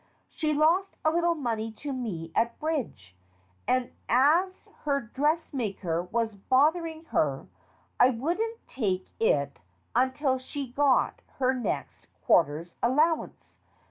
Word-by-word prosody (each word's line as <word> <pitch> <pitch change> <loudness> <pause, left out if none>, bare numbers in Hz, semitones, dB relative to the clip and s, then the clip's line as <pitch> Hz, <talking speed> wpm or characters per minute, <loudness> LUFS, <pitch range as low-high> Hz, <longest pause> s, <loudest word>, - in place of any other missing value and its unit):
She 310 -1 -1
lost 330 +6 +2
a 315 - +5
little 340 +1 +2
money 225 -6 -2
to 280 +5 -5
me 185 -11 -4
at 235 +1 +1
bridge, 245 - -3 0.5
and 255 -1 +1 0.2
as 320 +10 +3 0.2
her 280 -1 +2
dressmaker 235 - -1
was 220 +5 -2
bothering 315 - +1
her, 140 -3 0 0.5
I 250 - +7
wouldn't 350 - -2
take 190 -7 -2
it 140 - +1 0.4
until 260 +2 +2
she 265 0 -6
got 275 0 +2 0.2
her 260 -1 +2
next 250 -3 -4 0.2
quarter's 165 +1 +2
allowance. 305 +7 0
260 Hz, 115 wpm, -28 LUFS, 220-310 Hz, 0.5 s, I